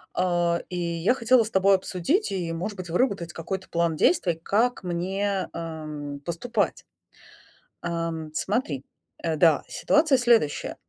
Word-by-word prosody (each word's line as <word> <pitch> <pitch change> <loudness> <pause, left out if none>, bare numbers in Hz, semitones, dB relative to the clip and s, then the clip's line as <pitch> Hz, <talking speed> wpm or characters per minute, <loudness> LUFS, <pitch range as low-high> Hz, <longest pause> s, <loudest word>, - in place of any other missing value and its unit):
а 175 -1 +1
и 180 - -4
я 170 +4 +1
хотела 250 -1 +4
с 220 - -7
тобой 195 0 +5
обсудить 190 - 0
и, 175 -4 -2
может 195 +6 -4
быть, 185 -3 -7
выработать 180 -3 0
какой-то 190 +3 -5
план 170 -1 +1
действий, 175 +2 +3
как 225 +7 +1
мне, 190 +2 -1
эм, 155 -3 -6
поступать. 205 +6 -1 1.0
Эм, 165 -2 -3
смотри, 165 - -1 0.4
э, 160 -2 0
да, 160 -1 +4
ситуация 300 -2 +3
следующая. 235 -11 +2
180 Hz, 130 wpm, -25 LUFS, 165-205 Hz, 1.0 s, тобой